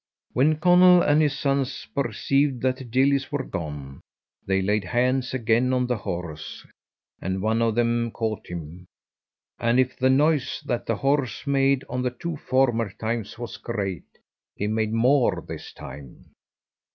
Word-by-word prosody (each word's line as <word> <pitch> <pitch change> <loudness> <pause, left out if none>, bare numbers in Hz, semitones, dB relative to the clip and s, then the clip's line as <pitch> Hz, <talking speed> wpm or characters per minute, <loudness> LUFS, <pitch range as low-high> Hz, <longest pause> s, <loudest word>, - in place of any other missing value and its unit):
When 150 +5 +3
Conall 180 +2 +6
and 150 +1 +4
his 145 -1 +1
sons 140 -3 -1
perceived 135 +1 0
that 130 0 +1
the 130 - -8
gillies 135 +4 +1
were 145 -2 -1
gone, 75 - -6 0.5
they 95 0 +2
laid 105 +2 +1
hands 125 +6 0
again 120 +1 +2
on 125 -1 +1
the 125 -1 -1
horse, 85 -6 -6 0.6
and 95 +1 -2
one 110 +3 +1
of 115 -2 +1
them 120 0 +1
caught 110 -3 -4
him, 85 +1 -8 0.7
and 120 +2 +2
if 130 0 +1
the 130 +1 +2
noise 145 +1 +2
that 120 -1 -2
the 115 - +1
horse 135 0 0
made 140 -1 +2
on 125 +1 -3
the 125 - 0
two 160 +7 -5
former 130 -6 +1
times 115 +1 -4
was 120 0 -6
great, 100 -6 -4 0.5
he 105 - -3
made 110 0 0
more 125 +4 +3
this - - -7
time. 70 -1 -12
120 Hz, 155 wpm, -25 LUFS, 110-135 Hz, 0.7 s, Conall